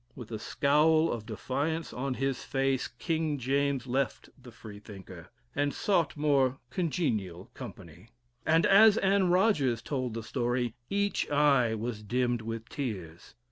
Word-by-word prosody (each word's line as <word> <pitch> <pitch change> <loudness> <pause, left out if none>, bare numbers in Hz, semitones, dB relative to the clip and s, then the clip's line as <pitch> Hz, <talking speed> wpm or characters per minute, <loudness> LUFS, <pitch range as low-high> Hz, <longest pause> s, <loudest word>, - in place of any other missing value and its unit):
With 120 -3 -10
a 110 - -4
scowl 155 +7 +3
of 110 -1 -5
defiance 145 +8 -3
on 130 +1 -3
his 135 0 -2
face, 135 -1 0
King 155 +4 -2
James 135 0 0
left 130 0 -2
the - - -14
Freethinker, 100 -4 -11 0.3
and 145 0 0
sought 170 -8 +1
more 140 -3 +2
congenial 110 - -2
company; 95 -5 -11 0.3
and 165 +1 +3
as 210 +2 +7
Anne 195 -2 +2
Rogers 160 - +2
told 130 -5 -3
the 115 - -4
story, 120 0 -1 0.2
each 200 0 0
eye 140 -6 +3
was 110 0 -4
dimmed 120 +2 0
with 115 0 -6
tears. 95 - -6
130 Hz, 140 wpm, -29 LUFS, 115-150 Hz, 0.3 s, as